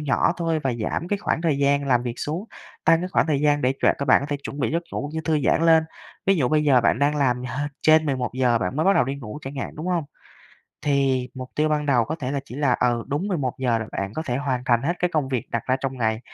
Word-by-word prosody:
nhỏ 150 +2 +2
thôi 165 -2 0
và 135 -4 -1
giảm 120 +9 -3
cái 205 - 0
khoảng 170 - -1
thời 150 -4 +1
gian 140 0 +2
làm 120 -2 +3
việc 120 -1 -4
xuống, 165 +7 -3 0.4
tăng 165 - +5
cái 180 - -3
khoảng - - +2
thời 145 -3 +1
gian 145 -1 +2
để 130 +1 +2
cho - - +5
các 140 - -1
bạn - - +6
có - - -4
thể 145 -1 -2
chuẩn 140 - -7
bị 120 - 0
giấc 170 +1 0
ngủ 145 - -3
như 160 - -1
thư 160 -1 +1
giãn 165 - +3
lên. 160 -1 +5 0.4
Ví 195 -1 +4
dụ 130 -5 +1
bây 150 -1 +2
giờ 130 -4 +5
bạn 115 - +2
đang 145 +1 +2
làm 125 -3 +1
hơ 145 +4 -3
trên 155 0 +5
11:00 125 -3 +1
bạn 90 +7 -3
mới 155 - +1
bắt 195 - +5
đầu - - +4
đi 135 +2 -3
ngủ 125 +1 -8
chẳng 135 +1 -7
hạn, - - -4
đúng 160 +4 -5
hông? 170 -4 0 0.8
Thì 135 -3 +1
mục 130 0 -7
tiêu 155 +1 +2
ban 150 -1 0
đầu 125 -5 +3
có 160 +5 -4
thể 130 -4 -4
là 140 - -1
chỉ 125 - -11
là, 140 -4 +2
ừ, 120 -1 +1
đúng 155 +9 -2
11:00 130 - 0
là 110 - -5
bạn 100 +1 -3
có 160 - -2
thể 120 -1 -1
hoàn 130 -3 -2
thành 120 0 +3
hết 170 +5 0
cái 180 -1 0
công 145 -4 0
việc 125 -4 -3
đặt 115 - -2
ra 130 0 +2
trong 135 -1 -3
ngày, 110 -1 0
140 Hz, 285 wpm, -23 LUFS, 125-155 Hz, 0.8 s, bạn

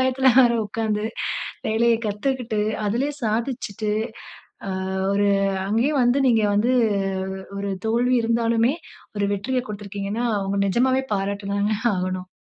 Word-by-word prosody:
பயத்துல 260 +1 +1
வேற 240 -2 +5
உக்கார்ந்து 215 0 -2 0.6
வேலைய 230 +2 +3
கத்துக்கிட்டு 225 0 -1 0.3
அதிலயே 260 +8 0
சாதிச்சிட்டு, 220 -2 -2 0.8
ஆ 195 - -3 0.4
ஒரு 205 +1 +2 0.4
அங்கேயே 230 +7 +2
வந்து 245 +3 +3
நீங்க 230 -3 +4
வந்து 220 +5 +2 0.9
ஒரு 200 0 -3 0.2
தோல்வி 240 +3 +2
இருந்தாலுமே, 230 +2 +2 0.4
ஒரு 205 - +1
வெற்றியைக் 250 +5 -1
குடுத்திருக்கிங்கன்னா 205 +2 -4
அவங்க 195 0 -2
நிஜமாவே 260 +6 +2
பாராட்டிதானே 200 +1 -1 0.2
ஆகணும். 185 0 -3
220 Hz, 110 wpm, -23 LUFS, 200-245 Hz, 0.9 s, வேற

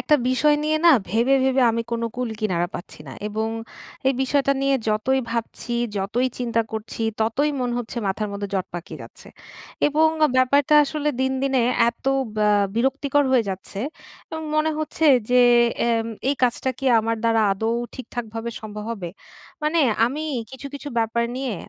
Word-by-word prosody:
একটা 300 - +3
বিষয় 295 +4 +3
না 295 - -1
নিয়ে 310 0 +2 0.3
ভেবে, 235 +6 +3
ভেবে 265 0 +3
আমি 230 +1 -1
কোনো 230 0 -1
কুল 250 -1 -2
কিনারা 175 -5 0
পাচ্ছি 175 - -8
না। - - -8 0.2
এবং 220 +1 -2 0.6
এই 270 - +2
বিষয়টা 275 +1 +2
নিয়ে 275 0 +3
যতই 235 +5 +1
ভাবছি, 235 +1 -4 0.3
যতই 215 +6 0
চিন্তা 235 -2 0
করছি, 220 +1 -5 0.2
ততই 230 +7 +1
মন 250 -1 -1
হচ্ছে 240 0 -6
মাথার 205 +2 -1
মধ্যে 200 0 -4
জট 190 -2 -1
পাকিয়ে 175 0 -7
যাচ্ছে। - - -14 0.6
এবং 310 +2 +3 0.2
আ - - -3
ব্যাপারটা 280 +3 +3
আসলে 300 +1 -2
দিনদিনে 265 -1 +1 0.3
এত 235 - -29 0.3
ব্যা 210 0 +3 0.3
বিরক্তিকর 275 +3 +1
হয়ে 245 -4 +4
যাচ্ছে, 195 +1 -6 0.5
এবং 320 0 -5
মনে 310 +1 +2
হচ্ছে 310 +1 -2 0.3
যে 250 0 +6 0.5
এম 225 -1 +1 0.2
এই - - +1
কাজটা 250 +1 +1
কি 270 - -3
আমার 225 +1 -1
দ্বারা 225 -1 +3
আদৌ 220 +4 -1 0.2
ঠিকঠাকভাবে 235 -2 -6
সম্ভব 210 -1 -7
হবে? 190 -6 -6 0.5
মানে 305 +2 +1 0.3
আমি 290 +6 -3 0.3
কিছু, 265 +1 -8
কিছু 285 +1 -6
ব্যাপার 230 +1 +1
নিয়ে 260 -4 -2
245 Hz, 165 wpm, -23 LUFS, 220-275 Hz, 0.6 s, যে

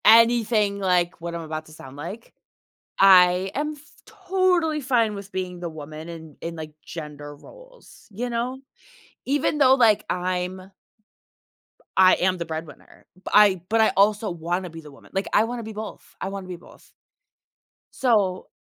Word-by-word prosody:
Anything 225 -3 +5
like 180 -3 +1
what 170 0 -5
I'm 170 - -4
about 155 -1 -6
to 155 - -15
sound 135 -3 -12
like. 180 +10 -8 0.7
I 185 -1 +6
am 300 +2 -1
f - - -17 0.3
totally 370 -7 0
fine 235 -5 +1
with 200 0 -9
being 180 -1 -4
the 175 -1 -4
woman 155 +1 -9
in 160 -3 -10
in, 165 0 -5
like, 155 -1 -8
gender 150 -3 -8
roles, - - -17
you 240 +5 -4
know? 245 +2 -3 0.7
Even 285 +2 0
though, 265 -2 +6
like, 230 -5 +4
I'm 180 +1 -3 1.3
I 185 0 +7
am 185 0 +1
the 170 - -4
breadwinner, 160 -1 -9 0.3
I 200 -4 +6
but, 225 +1 +3
I 220 - +5
also 210 +1 +3
wanna 175 +2 -3
be 165 0 -10
the 150 -2 -13
woman, 140 - -18
like, 195 0 -1
I - - +5
wanna 235 +1 -4
be 220 0 -7
both, 215 0 -9
I 190 - -2
wanna 195 -1 -7
be 180 - -6
both. 175 - -18 1.0
So 205 -8 +1
190 Hz, 160 wpm, -24 LUFS, 170-230 Hz, 1.3 s, I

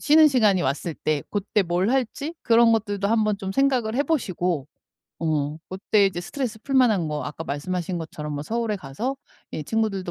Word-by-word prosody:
쉬는 310 +1 +6
시간이 215 -9 +3
왔을 145 +5 -2
때 150 -2 -1
그때 205 0 0
뭘 180 +3 0
할지 270 +5 -1
그런 230 -1 +5
것들도 205 -3 0
한번 215 -2 +2
좀 195 -2 -4
생각을 250 -3 +1
해 275 - +2
보시고 180 - -1 0.6
어 150 -1 0
그때 200 +2 +2
이제 175 -2 -2
스트레스 235 +3 -4
풀만한 240 - +3
거 150 -1 -3
아까 150 +2 -6
말씀하신 175 +5 -3
것처럼 155 -2 -6
뭐 145 0 -3
서울에 225 +3 -1
가서 210 - -4 0.4
이 155 - -3
친구들도 195 -1 -1
200 Hz, 360 characters per minute, -24 LUFS, 165-230 Hz, 0.6 s, 쉬는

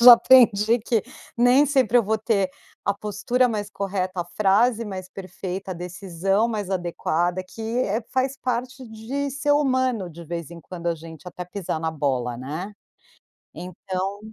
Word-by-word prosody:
já 240 0 +12
aprendi 235 -2 +5
que 225 -1 0 0.3
nem 250 +4 +5
sempre 260 -4 +3
eu - - +3
vou 220 +1 +1
ter 215 -3 +1 0.4
a 200 - +2
postura 210 +5 0
mais 205 -2 -3
correta, 185 -3 -2
a - - -16
frase 215 +4 +3
mais 185 -3 -6
perfeita, 190 0 -6
a - - -7
decisão 180 +4 -1
mais 205 -4 -3
adequada, 175 0 -1
que, 225 - -12
eh, 225 -1 -1
faz 260 +1 0
parte 250 0 -3
de 250 +6 -4
ser 285 +2 +1
humano, 260 -8 +1
de 170 0 -11
vez 170 -1 -5
em 170 - -9
quando 170 0 -8
a 170 - +2
gente, 165 +2 -10
até 180 0 -7
pisar 180 -3 -4
na 160 0 -1
bola, 130 -5 -1
né. 155 +10 -5 0.8
Então 185 +2 -4
200 Hz, 165 wpm, -24 LUFS, 180-235 Hz, 0.8 s, já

